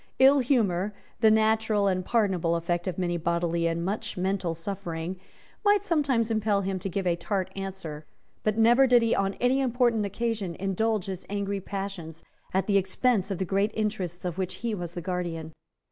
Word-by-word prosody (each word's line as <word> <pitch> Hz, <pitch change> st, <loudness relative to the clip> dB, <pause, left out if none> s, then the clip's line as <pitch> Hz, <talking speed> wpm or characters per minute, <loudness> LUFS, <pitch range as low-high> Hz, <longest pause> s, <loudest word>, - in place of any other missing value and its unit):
Ill 270 Hz, +2 st, +7 dB
humour, 210 Hz, -7 st, +1 dB, 0.2 s
the 220 Hz, -, +6 dB
natural 220 Hz, -1 st, +3 dB
and 185 Hz, -2 st, +1 dB
pardonable 185 Hz, -7 st, +1 dB
effect 175 Hz, +1 st, -1 dB
of 185 Hz, -, -2 dB
much 175 Hz, -3 st, -1 dB
bodily 170 Hz, 0 st, +1 dB
and 165 Hz, +1 st, -1 dB
much 210 Hz, +2 st, -3 dB
mental 185 Hz, -2 st, -1 dB
suffering, 175 Hz, -1 st, -4 dB, 0.5 s
might 410 Hz, -1 st, +4 dB
sometimes 275 Hz, -, +1 dB
impel 215 Hz, -2 st, +1 dB
him 190 Hz, -1 st, -2 dB
to 195 Hz, -, -4 dB
give 190 Hz, +1 st, -2 dB
a 175 Hz, -1 st, +2 dB
tart 185 Hz, +2 st, -2 dB
answer. 185 Hz, -6 st, -6 dB, 0.3 s
But 215 Hz, 0 st, 0 dB
never 240 Hz, +4 st, +6 dB
did 245 Hz, -2 st, +5 dB
he 230 Hz, -, +2 dB
on 195 Hz, 0 st, 0 dB
any 255 Hz, +2 st, +2 dB
important 240 Hz, -3 st, +2 dB
occasion 205 Hz, -3 st, -2 dB
indulge 195 Hz, +2 st, 0 dB
his 190 Hz, -2 st, -6 dB
angry 200 Hz, 0 st, -2 dB
passions 195 Hz, -5 st, -6 dB, 0.3 s
at 190 Hz, +1 st, +1 dB
the 200 Hz, -2 st, +3 dB
expense 195 Hz, +2 st, +1 dB
of 195 Hz, -, -2 dB
the 190 Hz, -, -1 dB
great 200 Hz, +3 st, +1 dB
interests 195 Hz, -5 st, -2 dB
of 180 Hz, +1 st, -3 dB
which 185 Hz, -1 st, -2 dB
he 230 Hz, -, 0 dB
was 175 Hz, -4 st, -5 dB
the 175 Hz, -, -3 dB
guardian. 165 Hz, -3 st, -4 dB
195 Hz, 180 wpm, -27 LUFS, 175-220 Hz, 0.5 s, Ill